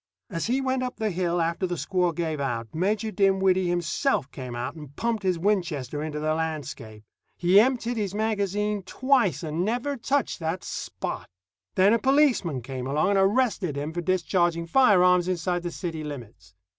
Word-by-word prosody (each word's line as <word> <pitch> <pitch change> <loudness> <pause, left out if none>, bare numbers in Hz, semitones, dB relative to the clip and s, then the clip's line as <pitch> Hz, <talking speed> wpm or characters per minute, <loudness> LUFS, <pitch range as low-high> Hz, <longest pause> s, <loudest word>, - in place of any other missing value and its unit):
As 170 +2 -2
he 255 +3 +1
went 260 -1 0
up 250 0 -3
the 215 -1 -1
hill, 175 -1 0
after 170 +3 0
the 175 - -2
squaw 180 -1 0
gave 160 -3 -2
out, 115 -5 -3
Major 205 +6 0
Dinwiddie 190 -2 +2
himself 175 - 0
came 125 -3 -7
out 120 +4 -3
and 150 -3 -11
pumped 230 -2 -1
his 185 -3 +1
Winchester 165 -8 -1
into 150 -1 -4
the 155 +1 0
landscape. 150 -9 -5 0.3
He 180 +3 +5
emptied 240 0 +1
his 205 -2 -2
magazine 210 -1 0
twice, 235 - +1
and 160 +2 -2
never 245 +7 -1
touched 275 +3 -1
that 165 +2 -3
Spot. - - -5 0.5
Then 195 +3 +5
a 230 - +3
policeman 250 - +2
came 130 0 -5
along 150 +7 +1
and 200 - +3
arrested 195 - +1
him 150 +3 -3
for 175 - -2
discharging 175 -1 +1
firearms 180 -4 +4
inside 180 0 -1
the 175 - -3
city 165 -2 -5
limits. 115 -11 -9
180 Hz, 170 wpm, -26 LUFS, 155-210 Hz, 0.5 s, He